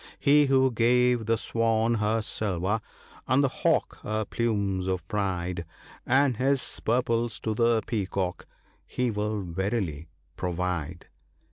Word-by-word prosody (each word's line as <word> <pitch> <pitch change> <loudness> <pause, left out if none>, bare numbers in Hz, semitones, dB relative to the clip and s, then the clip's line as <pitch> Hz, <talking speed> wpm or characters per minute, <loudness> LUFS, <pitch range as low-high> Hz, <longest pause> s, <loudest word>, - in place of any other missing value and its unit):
He 145 0 +5
who 130 -1 +4
gave 120 0 +3
the 115 0 +2
swan 115 +1 +1
her 110 0 0
silver, 100 0 -1 0.5
and 130 +3 +3
the 135 - +3
hawk 130 - 0
her 110 0 -2
plumes 100 -5 -1
of 90 -2 -2
pride, 90 -4 -2 0.4
And 130 -1 +3
his 135 +1 0
purples 115 -1 0
to 110 - -1
the 115 0 +2
peacock 95 -4 -2 0.2
— - - -36
He 125 -1 +2
will 105 -1 -2
verily 90 -3 -3 0.3
provide." 90 -2 -3
110 Hz, 130 wpm, -27 LUFS, 95-120 Hz, 0.5 s, He